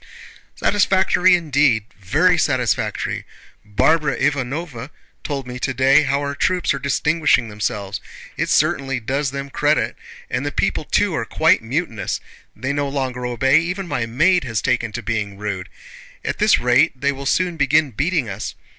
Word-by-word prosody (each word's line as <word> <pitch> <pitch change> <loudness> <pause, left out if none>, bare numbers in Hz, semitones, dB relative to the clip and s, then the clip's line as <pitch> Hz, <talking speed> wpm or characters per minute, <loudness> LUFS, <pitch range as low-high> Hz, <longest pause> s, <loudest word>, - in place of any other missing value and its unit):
"Satisfactory, 190 -2 +3
indeed! 140 -9 +2
Very 155 - +3
satisfactory! 130 -9 0 0.4
Barbara 140 +7 +2
Ivánovna 135 -1 -2 0.3
told 140 -3 -4
me 125 0 -7
today 135 +2 +3
how 140 -1 0
our 140 0 -3
troops 180 +3 +1
are 140 - -4
distinguishing 145 -3 +1
themselves. 105 -1 -3 0.3
It - - -2
certainly 135 -2 +1
does 135 +5 -1
them 140 +1 -6
credit! 150 +2 +1 0.3
And - - -2
the - - -2
people - - -1
too - - +1
are - - -1
quite - - +2
mutinous—they 125 - -4
no 145 0 -1
longer 130 -3 -3
obey, 130 +5 +3
even 180 +3 -3
my 120 -8 -2
maid 170 +10 +3
has 115 -4 -2
taken 120 -3 0
to 120 +1 -5
being 105 -2 -3
rude. 100 -3 -4 0.6
At - - -3
this - - +5
rate 125 +3 +2
they 140 +1 +1
will 140 0 -6
soon 180 +3 +1
begin 145 -1 +2
beating 145 - 0
us. 100 +1 -5
135 Hz, 150 wpm, -20 LUFS, 120-155 Hz, 0.6 s, this